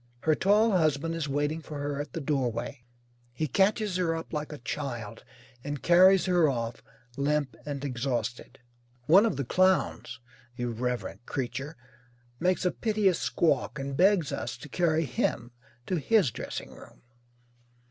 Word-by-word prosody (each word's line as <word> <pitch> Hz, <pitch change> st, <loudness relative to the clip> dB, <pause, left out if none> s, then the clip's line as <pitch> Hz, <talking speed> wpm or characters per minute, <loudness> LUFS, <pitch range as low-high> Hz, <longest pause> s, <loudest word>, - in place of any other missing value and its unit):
Her 160 Hz, -, +3 dB
tall 210 Hz, +7 st, +3 dB
husband 165 Hz, -3 st, +1 dB
is 165 Hz, -3 st, -3 dB
waiting 145 Hz, +3 st, -1 dB
for 150 Hz, -1 st, -8 dB
her 145 Hz, 0 st, -3 dB
at 145 Hz, -3 st, -8 dB
the -, -, -3 dB
doorway. 130 Hz, -3 st, -2 dB, 0.5 s
He 155 Hz, +6 st, -2 dB
catches 200 Hz, -, +1 dB
her 170 Hz, -3 st, +1 dB
up 165 Hz, 0 st, -7 dB
like 150 Hz, 0 st, -3 dB
a 150 Hz, -, -6 dB
child 120 Hz, -3 st, -5 dB, 0.4 s
and 145 Hz, -1 st, -5 dB
carries 185 Hz, +2 st, +6 dB
her 175 Hz, -4 st, +3 dB
off, 115 Hz, -3 st, -3 dB, 0.4 s
limp 145 Hz, -2 st, 0 dB
and 145 Hz, -1 st, -4 dB
exhausted. 125 Hz, -2 st, -3 dB, 0.5 s
One 195 Hz, -, +6 dB
of 215 Hz, -, -1 dB
the 140 Hz, -, -2 dB
clowns 185 Hz, -7 st, +1 dB, 0.4 s
(irreverent 120 Hz, 0 st, -3 dB
creature) 135 Hz, +3 st, -4 dB, 0.6 s
makes 185 Hz, +1 st, +1 dB
a 180 Hz, -, +3 dB
piteous 210 Hz, -5 st, +1 dB
squawk 135 Hz, +6 st, 0 dB
and 135 Hz, 0 st, -4 dB
begs 180 Hz, -2 st, +3 dB
us 115 Hz, +1 st, -4 dB
to 135 Hz, +4 st, -11 dB
carry 165 Hz, 0 st, +1 dB
him 120 Hz, -2 st, -2 dB, 0.3 s
to 185 Hz, -, -1 dB
his 195 Hz, -, +3 dB
dressing -, -, -6 dB
room. -, -, -15 dB
150 Hz, 145 wpm, -28 LUFS, 125-175 Hz, 0.6 s, carries